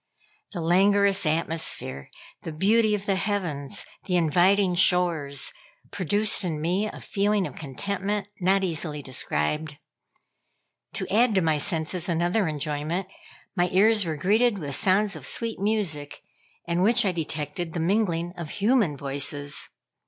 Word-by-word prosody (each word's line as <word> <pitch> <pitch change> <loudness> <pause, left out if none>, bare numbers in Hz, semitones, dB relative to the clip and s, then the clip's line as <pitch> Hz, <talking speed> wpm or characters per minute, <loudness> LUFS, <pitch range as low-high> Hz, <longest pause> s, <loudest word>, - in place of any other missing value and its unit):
The 175 - -4
languorous 195 +2 +3
atmosphere, 155 - -2 0.3
the 165 - -6
beauty 210 +6 +3
of 200 -1 -6
the 195 -2 +1
heavens, 180 -9 -3 0.2
the 180 - -1
inviting 180 +4 +3
shores, 170 -6 +2 0.4
produced 205 +4 +1
in 165 -4 -2
me 180 +7 0
a - - -10
feeling 205 0 0
of - - -7
contentment 200 +8 -3
not 195 +2 +2
easily 155 -4 -3
described. 135 - -2 1.2
To - - -4
add 225 0 +4
to 190 - +4
my 160 -3 +1
senses 165 +3 -2
another 175 +4 +1
enjoyment, 155 +4 -3 0.5
my 180 -1 +2
ears 210 +3 +4
were 160 -3 -3
greeted 215 +7 +2
with 145 -6 -4
sounds 200 +2 +2
of - - -9
sweet 230 -1 -1
music, 190 -9 -2 0.4
in 170 +1 0
which 220 +3 +4
I 190 - +2
detected 165 +1 -3
the 170 - -3
mingling 175 -1 0
of 170 -3 -7
human 205 - +1
voices. 145 +1 0
180 Hz, 135 wpm, -25 LUFS, 155-200 Hz, 1.2 s, add